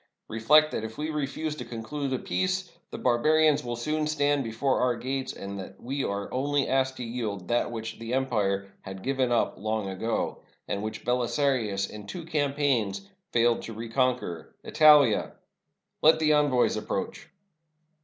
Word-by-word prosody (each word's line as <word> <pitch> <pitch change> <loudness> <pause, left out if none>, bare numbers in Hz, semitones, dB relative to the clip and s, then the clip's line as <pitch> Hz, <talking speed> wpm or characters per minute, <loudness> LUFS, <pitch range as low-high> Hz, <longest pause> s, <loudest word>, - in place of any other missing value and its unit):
Re 115 - -4
flect 155 +6 +6
that - - -3
if 110 0 -7
we 155 +1 -2
refuse 150 +1 -3
to 125 - -5
conclude 125 +5 -4
a 130 - +1
peace, 185 +4 -1 0.2
the - - -7
barbarians 150 +4 +3
will 120 -1 -3
soon 150 +6 -1
stand 145 -2 +1
before 130 +4 0
our 125 -1 +2
gates, 130 +2 -3
and 100 0 -7
that 95 +1 -9
we 135 +2 -3
are 100 0 -2
only 140 +2 +1
asked 130 0 +1
to 125 - -4
yield 110 -6 -4
that 120 0 +1
which 115 -1 -6
the 115 +2 -3
empire 100 -7 0
had 95 0 -9
given 130 -2 0
up 120 - +1
long 110 -1 -2
ago, 95 +4 -2 0.3
and 100 - -2
which 110 +1 -5
Belisarius 125 -5 +1
in 105 -1 -10
two 170 - -6
campaigns 145 - 0 0.2
failed 120 0 +3
to 115 - -7
reconquer 115 -6 -2
— - - -45
Italia! 150 -7 +5 0.7
Let 160 +1 +6
the 155 -1 +3
envoys 145 -4 +3
approach." 105 -2 -4
125 Hz, 165 wpm, -27 LUFS, 110-145 Hz, 0.7 s, flect